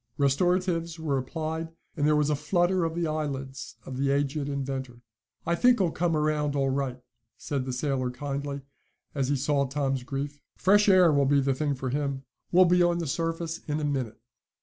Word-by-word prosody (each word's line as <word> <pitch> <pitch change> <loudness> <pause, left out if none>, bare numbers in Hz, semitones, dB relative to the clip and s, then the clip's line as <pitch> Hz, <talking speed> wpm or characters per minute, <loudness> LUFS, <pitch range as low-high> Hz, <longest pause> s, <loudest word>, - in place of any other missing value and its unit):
Restoratives 170 +3 +1
were 150 -4 -1
applied, 160 +4 -4 0.3
and 145 -2 +1
there 150 - +4
was 150 0 +2
a - - +2
flutter 175 +3 +1
of 165 0 -3
the 170 0 0
eyelids 140 -4 -4
of 130 - -6
the 135 +1 +1
aged 140 +1 0
inventor. 135 -3 -4 0.4
"I 170 - +1
think 245 +7 +4
he'll 180 -5 +1
come 165 -1 0
around 150 -1 0
all 135 -1 +1
right," 130 -2 -2 0.4
said 140 -3 -3
the 130 - -3
sailor 130 0 -1
kindly, 140 +2 -4 0.5
as 135 -3 0
he 145 - +2
saw 140 +1 +1
Tom's 135 -1 -1
grief. 140 +2 -5
"Fresh 205 +2 +4
air 185 -3 +6
will 140 -1 +3
be 140 +1 +4
the 135 0 +1
thing 145 +1 -1
for 130 -1 -4
him. 140 -1 -2 0.3
We'll 185 +1 +7
be 180 0 +4
on 175 0 +3
the 170 - -2
surface 165 +2 -2
in 150 0 -1
a 150 - -1
minute." 130 -6 -2
145 Hz, 195 wpm, -27 LUFS, 135-165 Hz, 0.5 s, We'll